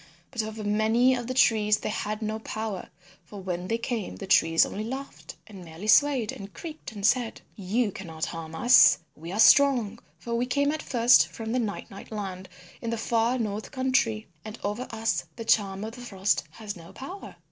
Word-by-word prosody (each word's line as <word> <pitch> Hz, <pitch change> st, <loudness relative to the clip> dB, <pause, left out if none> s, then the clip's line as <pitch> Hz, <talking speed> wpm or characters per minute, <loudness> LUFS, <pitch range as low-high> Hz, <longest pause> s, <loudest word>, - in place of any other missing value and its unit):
But 245 Hz, -4 st, -1 dB
over 215 Hz, 0 st, -6 dB
many 220 Hz, +5 st, +3 dB
of 245 Hz, -2 st, -3 dB
the 255 Hz, -, -2 dB
trees 210 Hz, -4 st, +4 dB
they -, -, -4 dB
had 215 Hz, 0 st, -3 dB
no 215 Hz, +1 st, -2 dB
power, 220 Hz, -3 st, -5 dB, 0.3 s
for 205 Hz, -, -10 dB
when 180 Hz, -1 st, -4 dB
they 230 Hz, -, 0 dB
came, 230 Hz, -, -4 dB
the -, -, -7 dB
trees 165 Hz, 0 st, +4 dB
only 210 Hz, -, -5 dB
laughed 265 Hz, +5 st, -7 dB
and 195 Hz, -4 st, -11 dB
merely 165 Hz, +4 st, -10 dB
swayed 255 Hz, 0 st, +4 dB
and 200 Hz, 0 st, -9 dB
creaked 315 Hz, -, -8 dB
and 205 Hz, -2 st, -4 dB
said, 240 Hz, 0 st, +1 dB
"You 205 Hz, +3 st, 0 dB
cannot 165 Hz, -4 st, -5 dB
harm 165 Hz, -1 st, -7 dB
us; 240 Hz, +9 st, +7 dB, 0.2 s
we 165 Hz, +3 st, -8 dB
are 200 Hz, -, -4 dB
strong, 235 Hz, -3 st, +5 dB, 0.2 s
for 235 Hz, -, -6 dB
we 240 Hz, +2 st, 0 dB
came 285 Hz, +3 st, +1 dB
at 310 Hz, 0 st, -3 dB
first 240 Hz, -1 st, +5 dB
from 225 Hz, -1 st, -6 dB
the 255 Hz, -, +1 dB
Night 215 Hz, -4 st, -4 dB
Night 195 Hz, -, -11 dB
Land 190 Hz, -3 st, -6 dB, 0.3 s
in 230 Hz, -, -3 dB
the 230 Hz, -, -2 dB
far 230 Hz, +2 st, +1 dB
north 215 Hz, -2 st, -3 dB
country, 255 Hz, -4 st, 0 dB, 0.2 s
and 215 Hz, +1 st, -8 dB
over 210 Hz, +5 st, -3 dB
us 225 Hz, 0 st, -1 dB
the 230 Hz, -, -7 dB
Charm 200 Hz, -3 st, +2 dB
of 220 Hz, -, -5 dB
the 245 Hz, -, -10 dB
Frost 200 Hz, -4 st, 0 dB
has 215 Hz, -2 st, -7 dB
no 170 Hz, -2 st, -12 dB
power." 365 Hz, +9 st, -9 dB
220 Hz, 200 wpm, -27 LUFS, 200-240 Hz, 0.3 s, us